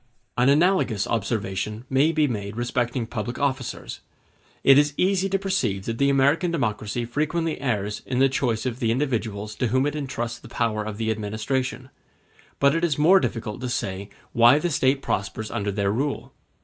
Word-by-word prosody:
An 125 +2 +3
analogous 150 - +3
observation 105 0 -2
may 135 +5 +3
be 155 -2 +2
made 105 -4 -4
respecting 120 0 -1
public 120 +2 -4
officers. 135 -3 -3 0.6
It 135 +1 +7
is 145 0 +1
easy 190 +1 +2
to 195 - +1
perceive 120 - -1
that 115 0 -3
the 140 0 +4
American 140 +6 +3
democracy 120 - -2
frequently 155 +5 -1
errs 105 -5 -2
in 125 - -2
the 135 +1 +5
choice 125 -4 -1
of 125 -1 -3
the 115 -4 0
individuals 115 -5 -1
to 125 - +1
whom 130 +4 +2
it 145 0 -1
entrusts 120 -5 -4
the - - -13
power 110 -2 -1
of 105 -1 -6
the 110 0 0
administration; 110 +5 -3 0.7
but 140 0 +4
it 165 +1 -1
is 160 -5 +1
more 175 +6 +6
difficult 110 - -3
to 125 - -3
say 100 -4 -3 0.2
why 120 +3 +6
the 170 +3 -1
State 135 -1 +2
prospers 100 +2 -3
under 100 0 -2
their 100 0 0
rule. 140 +6 -2
125 Hz, 175 wpm, -24 LUFS, 110-140 Hz, 0.7 s, It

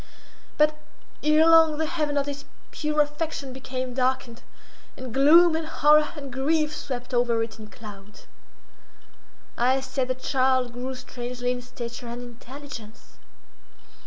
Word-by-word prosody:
But, 305 0 +4 0.5
ere 305 +1 +4
long 325 -2 +6
the 315 - 0
heaven 300 -2 -1
of 280 - +1
this 285 0 -5 0.3
pure 300 -1 0
affection 295 -2 -3
became 255 -1 -5
darkened, 255 -2 -1 0.6
and 255 -3 -7
gloom, 320 +5 +6
and 320 0 -2
horror, 300 -1 +4
and 280 -4 -8
grief 300 +3 +1
swept 250 -3 -6
over 240 -2 +2
it 225 -1 -8
in 215 - -9
clouds. 210 -2 -12 1.3
I 255 +3 +3
said 265 -1 -2
the 255 - -1
child 255 -1 +1
grew 255 +2 -5
strangely 245 0 -4
in 250 0 -3
stature 240 0 -7
and 240 +1 -6
intelligence. 245 -1 -11
260 Hz, 135 wpm, -25 LUFS, 245-300 Hz, 1.3 s, long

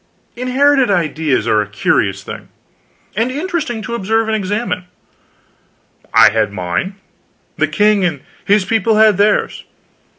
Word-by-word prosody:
Inherited 260 +1 +2
ideas 160 -6 0
are 105 - +3
a 105 - -4
curious 100 -1 0
thing, - - -9 0.7
and 225 +4 0
interesting 290 -6 -3
to 235 - -6
observe 225 +1 0
and 220 - 0
examine. 205 -1 -3 1.3
I - - +6
had 110 -1 0
mine, 90 - -3 0.6
the - - +1
king 210 -2 +2
and 160 -7 -1 0.2
his 200 -1 +2
people 225 +1 +1
had 215 -2 +4
theirs. 210 +1 +1
210 Hz, 130 wpm, -16 LUFS, 160-235 Hz, 1.3 s, I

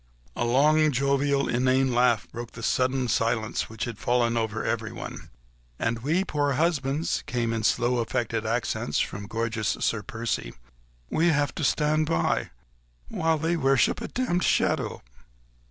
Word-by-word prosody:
A - - -1
long, 150 +5 +4
jovial, 140 +1 +1
inane 130 +1 +2
laugh 120 -2 +3
broke 120 0 -7
the 115 - -9
sudden 130 +1 +1
silence 115 -1 0
which 110 0 -5
had 115 -3 -7
fallen 120 -1 +1
over 110 -1 -1
everyone. 115 0 -4 0.5
"And 115 0 -1
we 155 +10 +1
poor 145 -5 0
husbands," 150 0 0
came 115 -2 -1
in 115 - -1
slow, 120 +3 +2
affected 115 -1 -1
accents 115 +1 -1
from 100 0 -3
gorgeous 110 -2 -1
Sir 110 - 0
Percy, 110 - -4 0.6
"we 165 - +2
have 145 -3 +2
to 160 - -4
stand 155 +2 +2
by... 85 0 0 0.6
while 160 0 +1
they 165 +3 0
worship 135 -7 +2
a - - -4
demmed 240 -9 -1
shadow." - - +1
125 Hz, 145 wpm, -26 LUFS, 115-145 Hz, 0.6 s, long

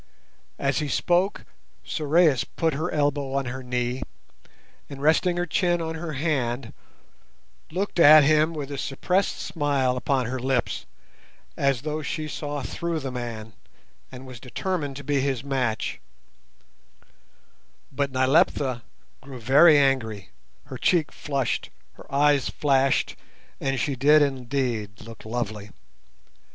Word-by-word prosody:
As 140 +2 0
he 150 - -2
spoke, 180 +7 0 0.4
Sorais 155 -2 +2 0.2
put 165 -2 +1
her 160 +5 -2
elbow 145 -2 0
on 140 -1 0
her 130 +2 -5
knee, 125 0 -2 0.9
and, 140 - -8
resting 160 +4 +2
her 175 - 0
chin 175 +1 +1
on 160 -1 -3
her 160 -1 -5
hand, 130 -5 -2 1.0
looked 185 +2 -3
at 155 -1 +9
him 155 +2 +3
with 145 -3 -6
a 140 - -4
suppressed 180 +8 0
smile 145 -7 0
upon 130 -1 0
her 130 +3 -3
lips, 130 0 -1 0.7
as 135 -2 0
though 155 0 -3
she 155 +2 -4
saw 145 -2 -4
through 170 +2 -3
the 135 -3 -5
man, 115 -3 -6 0.6
and 130 0 -10
was 130 -3 -10
determined 145 +3 -3
to 140 - -8
be 140 0 0
his 135 -3 -1
match; 130 -5 -2 1.9
but 140 0 -1
Nyleptha 130 -1 +2 0.4
grew 135 -2 -10
very 145 +7 +6
angry, 110 - +1 0.3
her 135 -3 -9
cheek 160 -6 +2
flushed, 140 -4 -2 0.2
her - - -16
eyes 145 -1 +3
flashed, 135 -2 +1 0.4
and 135 -1 -1
she 140 - -1
did 145 +4 +5
indeed 125 -6 -2
look 115 0 -12
lovely. 110 -3 -4
140 Hz, 130 wpm, -25 LUFS, 130-155 Hz, 1.9 s, at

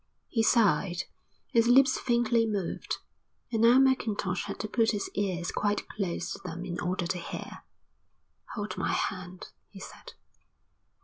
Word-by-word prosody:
He 230 - +1
sighed. 190 -6 +3 0.5
His 230 0 +4
lips 260 +2 +5
faintly 235 -2 +2
moved, 200 -5 -2 0.5
and 225 -2 0
now 235 +2 +7
Mackintosh 220 -8 +2
had - - -6
to 215 - -3
put 225 +1 +2
his 205 - -3
ears 185 -4 -1
quite 205 0 -1
close 185 -5 -3
to - - -5
them 175 0 -6
in 175 -1 -4
order 180 0 -1
to 180 +1 -2
hear. 170 - -7 0.9
"Hold 210 -1 -4
my - - 0
hand," 185 -1 -3 0.2
he 195 - -12
said. - - -11
205 Hz, 145 wpm, -29 LUFS, 180-230 Hz, 0.9 s, now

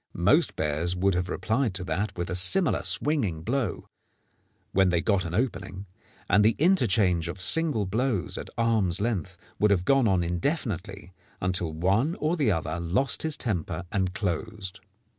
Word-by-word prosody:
Most - - +3
bears 80 +4 -1
would 95 +2 +1
have 90 +1 -2
replied 110 +1 -1
to 95 - -3
that 90 +5 -3
with 85 0 -3
a - - -1
similar 125 - +3
swinging 110 - 0
blow 120 -1 -2 0.8
when 95 -1 +3
they 85 -1 +2
got 95 0 +1
an 85 +1 -4
opening, 100 -5 -3 0.4
and 105 +3 +4
the 110 +1 +3
interchange 110 - +2
of 90 +2 -6
single 145 - +2
blows 105 - -1
at - - -5
arms' 110 -6 +1
length 95 -4 -2 0.2
would 105 - +4
have 95 -3 +1
gone 135 -1 +3
on 95 -3 +2
indefinitely 95 - -3 0.3
until 90 -2 -1
one 100 - +1
or 155 +3 -1
the 140 -10 +1
other 85 -1 -2
lost 95 +10 0
his 160 -2 +1
temper 90 -6 -3
and 95 -2 -1
closed. 100 0 -4
95 Hz, 160 wpm, -26 LUFS, 90-115 Hz, 0.8 s, and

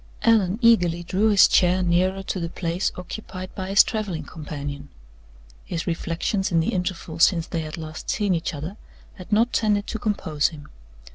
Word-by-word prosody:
Allan 215 -4 +3
eagerly 175 -7 +4
drew 195 +5 +1
his 205 -2 +7
chair 185 +1 +3
nearer 185 +2 +1
to 190 - -3
the 170 -1 -3
place 170 +2 -2
occupied 185 0 -7
by 190 -1 -5
his 200 +1 +7
traveling 205 -8 -3
companion. 145 -2 -7 0.7
His 170 - -4
reflections 175 +3 -1
in 165 - +3
the 160 - 0
interval 180 -3 -3
since 170 -1 +4
they 165 - -3
had 155 0 -6
last 155 -1 -7
seen 205 -3 +1
each 165 -2 -2
other 160 +8 -6 0.4
had 185 +2 -11
not 230 +4 +3
tended 210 -2 +1
to 220 - -5
compose 160 -9 0
him. 150 -2 -10
180 Hz, 170 wpm, -24 LUFS, 165-200 Hz, 0.7 s, his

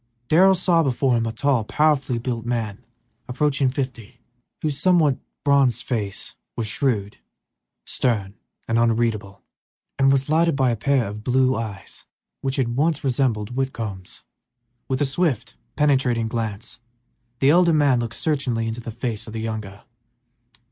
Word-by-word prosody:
Darrell 190 +4 +6
saw 175 -2 +3
before 130 -3 +1
him 115 -1 0
a - - -2
tall, 135 -1 +1
powerfully 140 0 +1
built 115 -1 -3
man, 115 -4 -3 0.4
approaching 140 +1 +1
fifty, 125 -5 -5 0.4
whose 145 -3 -1
somewhat 165 -7 +3 0.2
bronzed 135 -4 +3
face, 105 -6 -3 0.3
shrewd, 105 -2 -1 0.7
stern, 105 -6 -1 0.3
and 115 0 +2
unreadable, 115 -4 0 0.6
was 135 0 +3
lighted 165 +1 +2
by 130 -3 +2
a - - 0
pair 125 +1 +1
of 105 +1 -7
blue 130 +1 +2
eyes 105 -4 -7 0.4
which 135 0 -2
once 135 +5 +1
had - - -15
resembled 120 -5 0
Whitcomb's. 115 -8 -4 0.6
With 130 0 -1
a - - +4
swift, 135 - -1 0.2
penetrating 130 -6 +2
glance 115 0 -4 0.6
the 135 +3 +4
elder 175 +1 +5
man 145 -5 +3
looked 115 -1 -3
searchingly 130 -7 0
into 115 +2 -4
the 115 - -7
face 115 -1 -4
of 110 - -8
the 110 - -4
younger. 110 -3 -5
125 Hz, 140 wpm, -23 LUFS, 115-140 Hz, 0.7 s, Darrell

